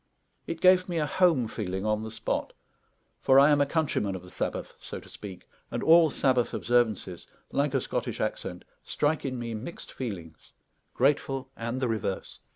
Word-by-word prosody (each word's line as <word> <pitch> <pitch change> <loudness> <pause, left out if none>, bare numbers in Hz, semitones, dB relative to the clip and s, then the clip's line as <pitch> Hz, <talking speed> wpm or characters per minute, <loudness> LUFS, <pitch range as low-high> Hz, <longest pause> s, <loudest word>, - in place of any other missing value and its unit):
It 165 - -4
gave 185 0 +5
me 175 - -1
a 155 - +2
home 160 -7 +3
feeling 95 -3 -4
on 110 0 +1
the 110 - -5
spot; 110 - -3 0.7
for 135 +1 +6
I 140 +2 +7
am 145 -1 +4
a 140 - +3
countryman 140 - 0
of 95 - -7
the 90 - -12
Sabbath, - - -3
so - - -7
to - - -16
speak, 95 -3 -10 0.2
and - - -3
all 165 0 +7
Sabbath 130 -3 +1
observances, 110 -7 0 0.2
like 140 0 +1
a 135 - +2
Scottish - - -3
accent, - - -3 0.2
strike 150 +1 0
in 130 -2 -2
me 120 -1 -4
mixed 115 +10 -7
feelings, 85 - -7 0.4
grateful 135 -1 +1
and 115 +3 -3
the 130 - 0
reverse. 110 -4 -3
130 Hz, 175 wpm, -28 LUFS, 110-145 Hz, 0.7 s, I